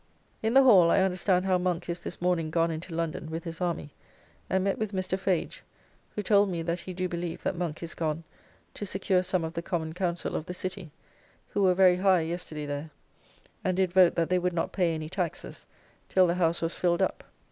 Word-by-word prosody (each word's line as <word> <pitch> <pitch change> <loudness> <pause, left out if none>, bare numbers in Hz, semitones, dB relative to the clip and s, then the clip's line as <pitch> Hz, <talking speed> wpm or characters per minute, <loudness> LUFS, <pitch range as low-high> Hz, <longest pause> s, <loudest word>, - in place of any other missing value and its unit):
In 225 +3 0
the 270 - +8
Hall 190 -10 +7
I - - +4
understand 185 0 +1
how 185 -1 +2
Monk 180 -1 -1
is 170 0 -3
this - - -7
morning 175 -3 +1
gone 165 +1 +1
into 165 +3 -6
London 165 -1 -3
with 165 +1 -4
his 165 0 -7
army; 170 -4 -2 0.6
and 190 0 +1
met 195 0 0
with 215 -2 -2
Mr. 185 0 -1
Fage, 190 -2 -1 0.5
who 210 - -2
told 205 0 +4
me 170 -2 -2
that 170 +2 -1
he 185 - -7
do 185 0 -2
believe 170 -1 -4
that - - -1
Monk 170 -2 -4
is 170 - -5
gone 160 0 -2 0.5
to - - -7
secure 190 -1 +1
some 185 -1 0
of 160 0 -4
the 170 - -3
Common 165 -3 -3
council 175 -1 -2
of 155 - -3
the 180 - -5
City, 185 -2 -5 0.6
who 205 - -1
were 185 -2 +4
very 180 -1 +5
high 185 -2 +4
yesterday 160 -2 -4
there, 145 +2 -4 0.7
and 185 -2 0
did 185 -2 +1
vote 185 -2 +6
that 165 +1 0
they 185 - +4
would 180 0 -1
not 165 - -1
pay 170 -3 +1
any 155 -1 -5
taxes 175 -1 -5 0.4
till 185 -1 +5
the 170 - +2
House 170 -1 +1
was 165 - -1
filled 175 -1 +1
up. - - -2
180 Hz, 220 wpm, -28 LUFS, 165-185 Hz, 0.7 s, the